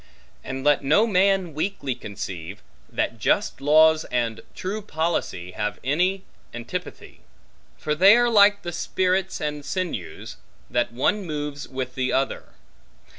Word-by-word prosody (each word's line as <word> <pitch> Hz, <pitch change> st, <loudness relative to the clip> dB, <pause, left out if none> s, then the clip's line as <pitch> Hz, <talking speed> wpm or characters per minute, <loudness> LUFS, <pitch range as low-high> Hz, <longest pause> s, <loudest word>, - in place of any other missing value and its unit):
And 130 Hz, 0 st, -5 dB
let 145 Hz, 0 st, +3 dB
no 155 Hz, +11 st, +4 dB
man 195 Hz, -4 st, +2 dB
weakly 155 Hz, -4 st, -2 dB
conceive, 100 Hz, -4 st, -7 dB, 0.3 s
that -, -, -2 dB
just -, -, 0 dB
laws 155 Hz, +2 st, +5 dB
and 120 Hz, -2 st, -2 dB
true 200 Hz, +4 st, -4 dB
policy 160 Hz, -, -2 dB
have 105 Hz, +3 st, -3 dB
any 180 Hz, +8 st, +1 dB, 0.3 s
antipathy; 150 Hz, +10 st, -7 dB, 0.6 s
for 150 Hz, -, -2 dB
they 195 Hz, +8 st, +7 dB
are 240 Hz, 0 st, +3 dB
like 205 Hz, -1 st, +5 dB
the 175 Hz, -, -4 dB
spirits 185 Hz, +2 st, 0 dB
and 150 Hz, -1 st, -3 dB
sinews, 180 Hz, +4 st, -5 dB, 0.3 s
that 120 Hz, -1 st, +1 dB
one 195 Hz, -, 0 dB
moves 150 Hz, -3 st, -5 dB
with 130 Hz, -1 st, -5 dB
the 130 Hz, 0 st, -1 dB
other. 135 Hz, 0 st, -1 dB
155 Hz, 130 wpm, -24 LUFS, 130-190 Hz, 0.6 s, they